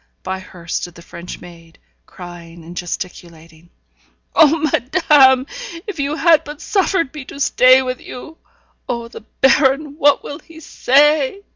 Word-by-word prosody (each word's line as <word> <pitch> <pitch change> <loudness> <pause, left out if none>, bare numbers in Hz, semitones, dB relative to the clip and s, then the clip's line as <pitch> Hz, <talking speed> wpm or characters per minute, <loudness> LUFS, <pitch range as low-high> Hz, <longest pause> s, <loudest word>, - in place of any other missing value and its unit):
By 190 0 -4
her 180 -2 -14
stood 175 +1 -4
the 170 - -14
French 170 +1 -10
maid, 165 -2 -15 0.3
crying 170 -2 -12
and 170 +2 -11
gesticulating. 170 -2 -8 0.6
'Oh, 320 0 +5
madame! 275 -3 +3 0.4
if 405 -8 -7
you 285 +2 -1
had 325 -1 +4
but 295 0 -10
suffered 380 -7 0
me 300 -3 -8
to 280 - -11
stay 260 -2 +5
with 255 -1 -5
you! 310 +6 -11 0.5
Oh! 235 -1 -3
the - - -11 0.2
baron, 275 +2 +2
what 290 -2 +3
will 290 - -8
he 325 -1 -16
say?' 295 +4 +2
265 Hz, 145 wpm, -18 LUFS, -, 0.6 s, Oh